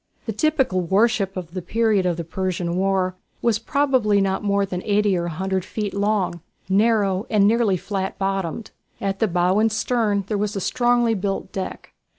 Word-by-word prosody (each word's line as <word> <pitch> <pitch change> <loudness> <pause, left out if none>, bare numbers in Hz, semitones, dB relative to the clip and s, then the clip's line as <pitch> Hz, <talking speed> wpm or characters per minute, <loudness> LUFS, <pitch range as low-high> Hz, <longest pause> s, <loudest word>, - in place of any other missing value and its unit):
The 225 - -2
typical 265 -7 +1
warship 195 +1 +1
of 175 -2 -6
the 185 +1 -4
period 215 -1 +1
of 175 -2 0
the 170 - -3
Persian 175 0 -2
War 190 -1 +1 0.3
was 230 -3 +2
probably 255 -5 +2
not 195 0 0
more 200 -1 +2
than 180 -2 -4
eighty 205 -1 +2
or 170 -1 -1
a - - -2
hundred 190 +3 -2
feet 205 +1 -4
long, 200 -4 0 0.3
narrow, 205 0 +2
and 205 -2 +4
nearly 220 -4 +2
flat 195 +1 -4
bottomed. 195 +1 -2 0.3
At 195 0 -2
the 220 - +2
bow 180 +2 +2
and 225 +1 +3
stern 215 -2 0
there 205 +1 -2
was 210 +1 -1
a - - -1
strongly 240 +2 +2
built 195 -1 -3
deck. 190 -1 -6
200 Hz, 180 wpm, -22 LUFS, 185-220 Hz, 0.3 s, and